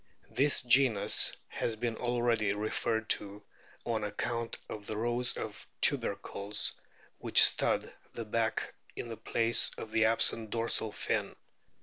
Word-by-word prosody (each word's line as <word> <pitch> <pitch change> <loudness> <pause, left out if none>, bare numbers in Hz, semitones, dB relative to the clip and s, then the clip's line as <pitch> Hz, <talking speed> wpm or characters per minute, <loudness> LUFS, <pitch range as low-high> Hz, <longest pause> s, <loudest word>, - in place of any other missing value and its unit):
This 140 +1 +3
genus 125 -4 +4 0.2
has 115 - -3
been 115 0 -3
already 120 -4 0
referred 110 +1 -2
to 100 0 -2 0.4
on 115 -2 -2
account 115 +2 -4
of 105 -1 -8
the 110 - -4
rows 120 +2 0
of 105 -1 -7
tubercles 105 -5 0 0.5
which - - +6
stud - - +1 0.2
the 115 - -7
back 110 +1 -2 0.2
in 120 - -6
the 115 - -5
place 115 0 +3
of 110 - -8
the 110 0 +2
absent 110 0 +1
dorsal 115 -1 -1
fin. - - -3
115 Hz, 130 wpm, -30 LUFS, 105-120 Hz, 0.5 s, which